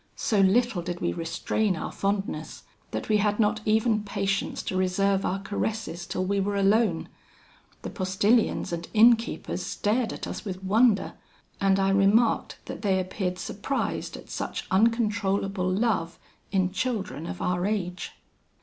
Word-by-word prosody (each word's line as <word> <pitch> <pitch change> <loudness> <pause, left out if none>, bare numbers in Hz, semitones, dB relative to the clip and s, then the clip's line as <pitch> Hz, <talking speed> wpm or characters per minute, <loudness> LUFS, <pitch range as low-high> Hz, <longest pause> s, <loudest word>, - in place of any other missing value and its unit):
So 210 - 0
little 205 +1 +3
did 175 0 -5
we - - -1
restrain 175 +4 -1
our - - -5
fondness, 200 0 -3 0.3
that - - -4
we 215 - +3
had 210 +1 +1
not 215 0 +2
even 220 0 +2
patience 195 -1 -2
to - - -3
reserve 190 +1 +1
our 190 - -1
caresses 195 -3 -3
till 185 - -2
we 200 +1 0
were 200 +1 -1
alone. 200 -2 +2 0.8
The - - -5
postilions 200 +1 +1
and 170 0 -5
innkeepers 230 +1 +3
stared 225 +2 0
at - - -6
us - - -6
with 190 -2 -6
wonder, 215 +2 +3 0.5
and 195 0 +3
I 195 0 +2
remarked 200 +4 +3
that - - -7
they 195 -3 +2
appeared 185 0 -3
surprised 235 +9 -3
at - - -13
such - - -4
uncontrollable 200 -3 +1
love 195 -5 0 0.3
in 190 -2 +1
children 200 - -3
of 90 - -6
our 180 +1 0
age. 185 -4 -3
195 Hz, 150 wpm, -26 LUFS, 185-215 Hz, 0.8 s, little